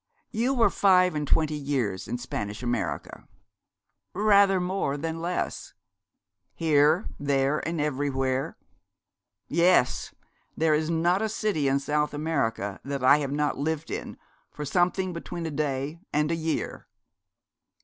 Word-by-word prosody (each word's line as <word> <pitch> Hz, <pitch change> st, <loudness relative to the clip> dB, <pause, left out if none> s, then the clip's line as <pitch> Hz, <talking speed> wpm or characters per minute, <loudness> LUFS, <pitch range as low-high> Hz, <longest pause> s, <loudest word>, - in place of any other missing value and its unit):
You 245 Hz, +5 st, 0 dB
were 235 Hz, -2 st, +4 dB
five 185 Hz, -2 st, +4 dB
and 150 Hz, -1 st, -2 dB
twenty 155 Hz, +1 st, +2 dB
years 135 Hz, -10 st, -2 dB
in 120 Hz, -, -2 dB
Spanish 105 Hz, -2 st, -5 dB
America?' 120 Hz, 0 st, -3 dB, 0.9 s
'Rather 200 Hz, -2 st, +5 dB
more 180 Hz, -6 st, -1 dB
than 165 Hz, +2 st, -4 dB
less.' 175 Hz, +1 st, -3 dB, 0.8 s
'Here, 155 Hz, +2 st, +3 dB
there, 140 Hz, +1 st, +1 dB
and 165 Hz, 0 st, -2 dB
everywhere?' 135 Hz, -2 st, -1 dB, 0.9 s
'Yes; 170 Hz, -4 st, +2 dB, 0.5 s
there 160 Hz, -1 st, +3 dB
is 155 Hz, +1 st, +1 dB
not 170 Hz, +4 st, +2 dB
a 220 Hz, -, 0 dB
city 205 Hz, -9 st, 0 dB
in 135 Hz, 0 st, +3 dB
South 150 Hz, +1 st, -1 dB
America 115 Hz, -10 st, -1 dB
that 140 Hz, -1 st, -4 dB
I 135 Hz, +3 st, +7 dB
have 140 Hz, -2 st, -3 dB
not 150 Hz, -1 st, -1 dB
lived 160 Hz, +2 st, -2 dB
in -, -, -5 dB, 0.3 s
for 150 Hz, -, -6 dB
something 180 Hz, +3 st, +1 dB
between 170 Hz, 0 st, -6 dB
a 160 Hz, -, -3 dB
day 145 Hz, +1 st, -2 dB
and 150 Hz, +2 st, +1 dB
a -, -, +1 dB
year.' 160 Hz, 0 st, -3 dB
150 Hz, 135 wpm, -26 LUFS, 140-175 Hz, 0.9 s, I